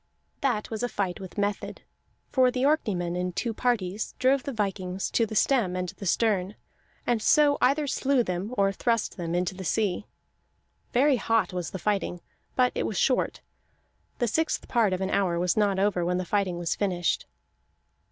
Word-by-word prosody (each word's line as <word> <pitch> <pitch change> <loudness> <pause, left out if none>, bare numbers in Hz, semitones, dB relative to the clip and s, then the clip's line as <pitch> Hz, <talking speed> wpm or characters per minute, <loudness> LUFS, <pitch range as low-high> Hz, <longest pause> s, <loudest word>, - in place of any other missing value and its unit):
That 240 -7 -1
was 220 - -3
a 245 - 0
fight 190 -5 -2
with 190 0 -10
method, 205 0 -2 0.5
for 255 -2 +4
the 250 +1 -1
Orkneymen 190 - +1
in 180 0 -2
two 230 +5 -2
parties 210 -4 -1
drove 265 +1 +3
the 275 - -4
vikings 195 -4 -2
to 230 - +2
the 215 - -6
stem 210 -6 +2
and 180 -1 -2
the 195 - -7
stern, 200 -1 +1 0.5
and 235 -2 +1
so 290 +4 +4
either 285 +4 +3
slew 275 -1 +1
them 185 +2 -3
or 195 0 +3
thrust 230 +3 0
them 170 -2 -3
into 180 +1 0
the 190 0 -7
sea. 200 +2 0 0.8
Very 270 +2 +4
hot 225 -6 +1
was 180 -2 -3
the - - -5
fighting, 190 -1 -1 0.4
but 250 -1 +3
it - - -1
was 210 - -3
short; 255 - +1 0.8
the 240 - +1
sixth 320 +8 0
part 230 -5 +2
of 185 0 -1
an 190 - -1
hour 180 -4 +1
was 175 0 +1
not 205 -2 +2
over 195 -2 +1
when 180 +1 0
the 185 - -2
fighting 190 -2 0
was 175 -1 -1
finished. 180 -4 0
205 Hz, 180 wpm, -27 LUFS, 180-240 Hz, 0.8 s, for